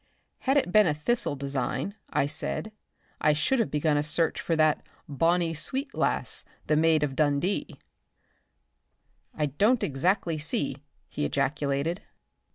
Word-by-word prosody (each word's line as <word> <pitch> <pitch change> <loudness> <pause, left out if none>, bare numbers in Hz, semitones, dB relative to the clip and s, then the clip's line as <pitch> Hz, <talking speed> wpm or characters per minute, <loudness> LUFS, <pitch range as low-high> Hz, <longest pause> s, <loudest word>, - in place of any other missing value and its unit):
"Had 270 +2 +1
it 220 -10 +1
been 215 +1 +5
a 150 - +1
thistle 155 +1 +1
design," 140 +7 -2 0.2
I - - +1
said, 70 - -4 0.5
"I 150 - +3
should 160 - +1
have 230 - +1
begun 150 0 +1
a - - +2
search 155 +2 +1
for 165 - 0
that 155 -1 +3 0.3
'bonnie 165 +3 +1
sweet 270 - -2
lass, - - -1 0.2
the 155 - +2
Maid 160 -1 +3
o' - - +3
Dundee." 145 +7 -1 1.6
"I 150 - 0
don't 210 - +2
exactly 165 +3 0
see," 145 -3 +1 0.3
he 150 - -4
ejaculated. 140 +4 -1
155 Hz, 140 wpm, -27 LUFS, 145-180 Hz, 1.6 s, been